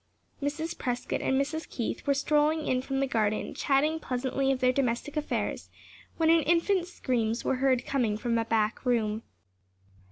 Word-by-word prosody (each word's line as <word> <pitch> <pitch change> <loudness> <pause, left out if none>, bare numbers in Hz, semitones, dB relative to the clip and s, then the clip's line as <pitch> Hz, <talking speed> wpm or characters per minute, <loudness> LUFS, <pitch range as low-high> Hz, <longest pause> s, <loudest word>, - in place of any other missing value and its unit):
Mrs. 315 +4 -2
Prescott 245 -1 -2
and 265 - +1
Mrs. 310 +3 -2
Keith 235 +2 -4
were 280 - +3
strolling 300 +2 +2
in 255 -1 +1
from 270 +1 -2
the - - +3
garden, 215 -3 0
chatting 290 +3 +1
pleasantly 270 0 -1
of 265 - 0
their 255 -1 +4
domestic 255 +2 -1
affairs, 300 -1 -2 0.5
when 325 -1 +4
an 330 0 +5
infant's 345 +4 +1
screams 235 -7 -1
were 265 - +1
heard 255 -1 +2
coming 235 -7 0
from 230 +1 -1
a 225 - -1
back 220 -1 0
room. 225 -4 +1
270 Hz, 165 wpm, -28 LUFS, 240-300 Hz, 0.5 s, an